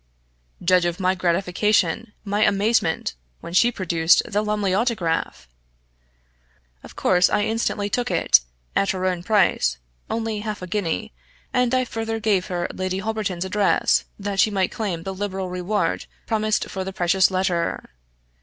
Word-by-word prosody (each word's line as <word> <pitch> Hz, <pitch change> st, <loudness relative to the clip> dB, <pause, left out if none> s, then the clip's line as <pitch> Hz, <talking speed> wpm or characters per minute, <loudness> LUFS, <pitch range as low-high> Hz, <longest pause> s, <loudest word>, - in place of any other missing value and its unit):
Judge 180 Hz, 0 st, +4 dB
of 175 Hz, +1 st, -2 dB
my 185 Hz, 0 st, +2 dB
gratification, 190 Hz, +3 st, +1 dB
my 205 Hz, +1 st, +1 dB
amazement, 200 Hz, -, +1 dB, 0.3 s
when 170 Hz, -, -9 dB
she 235 Hz, +6 st, +4 dB
produced 170 Hz, -5 st, +3 dB
the 210 Hz, -2 st, 0 dB
Lumley 210 Hz, -3 st, 0 dB
Autograph! 180 Hz, -, -1 dB, 1.3 s
Of -, -, -13 dB
course 180 Hz, -1 st, +3 dB
I 205 Hz, -, +1 dB
instantly 220 Hz, -2 st, -1 dB
took 245 Hz, +4 st, -1 dB
it, -, -, +5 dB, 0.4 s
at 195 Hz, -, +2 dB
her 185 Hz, -1 st, -1 dB
own 180 Hz, -2 st, 0 dB
price 180 Hz, -, +2 dB, 0.3 s
only 225 Hz, -2 st, -2 dB
half 210 Hz, -2 st, -5 dB
a -, -, -3 dB
guinea 170 Hz, -, -2 dB, 0.4 s
and 250 Hz, -2 st, +2 dB
I 255 Hz, 0 st, +2 dB
further 225 Hz, -1 st, -3 dB
gave 210 Hz, -4 st, +1 dB
her 175 Hz, -1 st, -2 dB
Lady 185 Hz, 0 st, -2 dB
Holberton's 205 Hz, -3 st, -2 dB
address, 200 Hz, +1 st, +2 dB
that 200 Hz, -1 st, -4 dB
she 215 Hz, -, +5 dB
might 195 Hz, -3 st, 0 dB
claim 185 Hz, -7 st, -3 dB
the 195 Hz, -, -4 dB
liberal 190 Hz, -1 st, -4 dB
reward 180 Hz, +3 st, -1 dB, 0.2 s
promised 215 Hz, -1 st, 0 dB
far 190 Hz, -, -4 dB
the 190 Hz, -, -5 dB
precious 180 Hz, +1 st, +3 dB
letter. 185 Hz, -2 st, -1 dB
195 Hz, 150 wpm, -23 LUFS, 180-215 Hz, 1.3 s, it